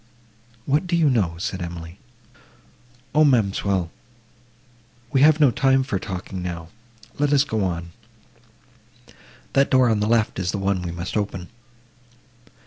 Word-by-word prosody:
—"What 150 Hz, +6 st, +1 dB
do 175 Hz, -, 0 dB
you 160 Hz, -4 st, +3 dB
know?" 95 Hz, -9 st, +1 dB
said 95 Hz, +1 st, -4 dB
Emily.—"O, 120 Hz, -, -6 dB
ma'amselle, 100 Hz, -, +1 dB, 1.2 s
we 135 Hz, -2 st, +2 dB
have 155 Hz, +1 st, +6 dB
no 145 Hz, -5 st, +5 dB
time 135 Hz, -1 st, +2 dB
for 110 Hz, -8 st, -2 dB
talking 95 Hz, -1 st, -6 dB
now; 85 Hz, -2 st, -6 dB, 0.5 s
let 145 Hz, 0 st, +2 dB
us 145 Hz, -1 st, +5 dB
go 110 Hz, -7 st, -2 dB
on. 85 Hz, -2 st, -3 dB, 1.6 s
That 135 Hz, 0 st, +3 dB
door 130 Hz, -2 st, +4 dB
on 110 Hz, -, +1 dB
the 105 Hz, -, 0 dB
left 115 Hz, -3 st, +1 dB
is 90 Hz, -2 st, -2 dB
the 100 Hz, -, -1 dB
one 100 Hz, -1 st, 0 dB
we 90 Hz, -, -4 dB
must 85 Hz, +1 st, -5 dB
open." 95 Hz, -4 st, -3 dB
110 Hz, 135 wpm, -23 LUFS, 90-135 Hz, 1.6 s, have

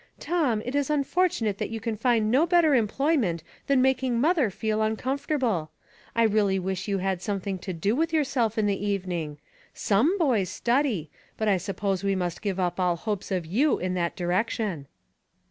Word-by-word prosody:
Tom, 280 Hz, -11 st, 0 dB
it 250 Hz, -, -4 dB
is 285 Hz, -1 st, 0 dB
unfortunate 295 Hz, -, +1 dB
that -, -, -2 dB
you 225 Hz, 0 st, -4 dB
can 225 Hz, 0 st, -3 dB
find 220 Hz, -1 st, +2 dB
no 285 Hz, +7 st, +4 dB
better 340 Hz, -4 st, +4 dB
em 230 Hz, -5 st, +3 dB
ployment 250 Hz, -, 0 dB, 0.3 s
than 275 Hz, -2 st, +4 dB
making 260 Hz, -2 st, +1 dB
mother 300 Hz, -, +3 dB
feel 215 Hz, +2 st, -2 dB
uncomforta 260 Hz, +7 st, -1 dB
ble. 190 Hz, -12 st, 0 dB, 0.5 s
I 230 Hz, -, +4 dB
really 205 Hz, -3 st, +2 dB
wish 190 Hz, +1 st, -3 dB
you 200 Hz, -1 st, 0 dB
had 190 Hz, -1 st, -1 dB
something 195 Hz, -2 st, -3 dB
to 185 Hz, -, -5 dB
do 190 Hz, +6 st, 0 dB
with 325 Hz, +3 st, 0 dB
yourself 260 Hz, -8 st, +1 dB
in 215 Hz, -, +2 dB
the 200 Hz, -1 st, -1 dB
evening. 180 Hz, -7 st, -2 dB, 0.4 s
Some 255 Hz, -, +2 dB
boys 240 Hz, -, +1 dB
study, 235 Hz, -, 0 dB, 0.3 s
but 220 Hz, -, -1 dB
I 200 Hz, -2 st, +4 dB
suppose 195 Hz, +1 st, -2 dB
we 195 Hz, -1 st, +1 dB
must 180 Hz, -2 st, -3 dB
give 195 Hz, -3 st, -2 dB
up 180 Hz, 0 st, -1 dB
all 180 Hz, -2 st, +2 dB
hopes 205 Hz, +2 st, -4 dB
of 185 Hz, -3 st, -1 dB
you 250 Hz, -, +2 dB
in 185 Hz, 0 st, -2 dB
that 170 Hz, -2 st, -1 dB
direction." 180 Hz, -3 st, -1 dB
215 Hz, 185 wpm, -26 LUFS, 190-265 Hz, 0.5 s, no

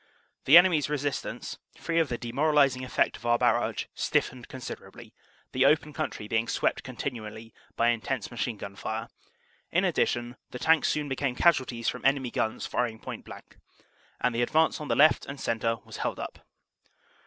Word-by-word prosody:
The 150 Hz, +5 st, +9 dB
enemy 175 Hz, -3 st, +6 dB
s 145 Hz, -, -3 dB
resistance, 145 Hz, -1 st, -3 dB, 0.2 s
free 165 Hz, 0 st, 0 dB
of 160 Hz, -4 st, +2 dB
the 120 Hz, -, -2 dB
demoralizing 135 Hz, +1 st, +2 dB
effect 130 Hz, -, 0 dB
of 115 Hz, -, -14 dB
our 120 Hz, 0 st, +4 dB
barrage, 120 Hz, -2 st, +1 dB
stif -, -, +1 dB
fened 125 Hz, -1 st, -12 dB
considerably, 130 Hz, -1 st, -9 dB, 0.4 s
the 130 Hz, -, +2 dB
open 150 Hz, 0 st, +2 dB
country 145 Hz, -9 st, -4 dB
being 115 Hz, +1 st, 0 dB
swept -, -, 0 dB
continually 115 Hz, -4 st, -6 dB, 0.2 s
by 115 Hz, -, +3 dB
intense 120 Hz, 0 st, -2 dB
machine 120 Hz, -1 st, -3 dB
gun 100 Hz, -1 st, -8 dB
fire. 110 Hz, +2 st, -4 dB, 0.6 s
In -, -, +2 dB
addition, 120 Hz, +1 st, 0 dB
the -, -, -7 dB
Tanks 160 Hz, +4 st, +3 dB
soon 150 Hz, -1 st, -1 dB
became 135 Hz, -1 st, -1 dB
casualties 130 Hz, -7 st, +2 dB
from -, -, -2 dB
enemy 135 Hz, -1 st, +2 dB
guns 110 Hz, -, -1 dB
firing 120 Hz, -2 st, -1 dB
point -, -, -8 dB
blank, -, -, -12 dB, 0.6 s
and 125 Hz, -, +1 dB
the 115 Hz, -, 0 dB
advance 155 Hz, +6 st, +2 dB
on 150 Hz, -, -5 dB
the -, -, +1 dB
left 155 Hz, +2 st, +5 dB
and 140 Hz, 0 st, -7 dB
centre 115 Hz, 0 st, 0 dB
was -, -, -9 dB
held -, -, -2 dB
up. -, -, -6 dB
125 Hz, 175 wpm, -28 LUFS, 115-145 Hz, 0.6 s, The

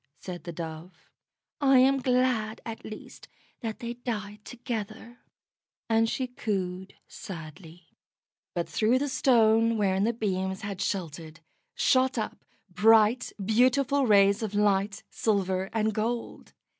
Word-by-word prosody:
said 180 Hz, -2 st, -8 dB
the 170 Hz, -, -5 dB
Dove. 165 Hz, +1 st, -9 dB, 0.5 s
"I 270 Hz, -2 st, +5 dB
am 270 Hz, +2 st, +5 dB
glad 250 Hz, -4 st, +1 dB
at 225 Hz, -1 st, -7 dB
least 215 Hz, -, -10 dB, 0.3 s
that 220 Hz, -3 st, -5 dB
they 235 Hz, 0 st, -4 dB
died 210 Hz, -4 st, -6 dB
together," 230 Hz, -1 st, -6 dB, 0.7 s
and 225 Hz, 0 st, +2 dB
she 260 Hz, -, -2 dB
cooed 190 Hz, -6 st, -4 dB
sadly. 165 Hz, 0 st, -10 dB, 0.7 s
But 170 Hz, -1 st, -1 dB
through 215 Hz, +9 st, +2 dB
the 285 Hz, +2 st, -1 dB
Stone 225 Hz, -3 st, +3 dB
wherein 195 Hz, -2 st, +1 dB
the 230 Hz, -, +2 dB
beams 190 Hz, -4 st, -2 dB
had 200 Hz, -2 st, -5 dB
sheltered, 165 Hz, -3 st, -4 dB, 0.4 s
shot 260 Hz, 0 st, +2 dB
up 220 Hz, -, -4 dB, 0.2 s
bright, 215 Hz, +5 st, +4 dB
beautiful 255 Hz, +5 st, +3 dB
rays 200 Hz, -1 st, +5 dB
of 210 Hz, -2 st, -4 dB
light, 205 Hz, 0 st, +1 dB
silver 190 Hz, -3 st, 0 dB
and 220 Hz, -1 st, 0 dB
gold. 230 Hz, +3 st, -4 dB
215 Hz, 125 wpm, -27 LUFS, 190-235 Hz, 0.7 s, I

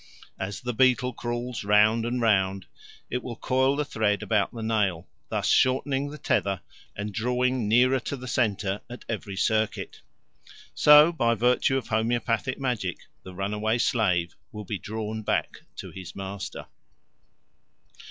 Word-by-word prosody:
As 95 Hz, +1 st, -4 dB
the 125 Hz, 0 st, -3 dB
beetle 125 Hz, +1 st, +3 dB
crawls 120 Hz, 0 st, -4 dB
round 105 Hz, +3 st, +4 dB
and 125 Hz, +1 st, -1 dB
round, 95 Hz, -4 st, +1 dB, 0.5 s
it 125 Hz, -, -1 dB
will 120 Hz, -2 st, -6 dB
coil 130 Hz, +3 st, +1 dB
the 150 Hz, 0 st, -1 dB
thread 105 Hz, -5 st, 0 dB
about 105 Hz, -3 st, +1 dB
the 115 Hz, -2 st, -7 dB
nail, 100 Hz, -7 st, 0 dB, 0.2 s
thus -, -, -1 dB
shortening 135 Hz, +2 st, +2 dB
its 150 Hz, -, -11 dB
tether 95 Hz, -2 st, +1 dB, 0.3 s
and 105 Hz, +1 st, -5 dB
drawing 125 Hz, +1 st, 0 dB
nearer 125 Hz, +4 st, +4 dB
to 140 Hz, +3 st, -5 dB
the 130 Hz, 0 st, -8 dB
centre 105 Hz, -5 st, 0 dB
at 120 Hz, -, -10 dB
every 105 Hz, -3 st, -4 dB
circuit. 110 Hz, +2 st, -1 dB, 0.7 s
So 150 Hz, +2 st, +7 dB
by 115 Hz, -8 st, +1 dB
virtue 125 Hz, +3 st, +2 dB
of 130 Hz, -, -5 dB
homoeopathic 115 Hz, +2 st, 0 dB
magic 120 Hz, -10 st, -2 dB, 0.2 s
the 95 Hz, -1 st, -11 dB
runaway 105 Hz, +4 st, -1 dB
slave 90 Hz, -9 st, +1 dB, 0.2 s
will 105 Hz, -1 st, -8 dB
be 100 Hz, 0 st, -4 dB
drawn 110 Hz, +3 st, -5 dB
back -, -, -1 dB, 0.2 s
to -, -, -8 dB
his 95 Hz, -2 st, -9 dB
master. 95 Hz, 0 st, -6 dB
115 Hz, 145 wpm, -26 LUFS, 100-125 Hz, 0.7 s, So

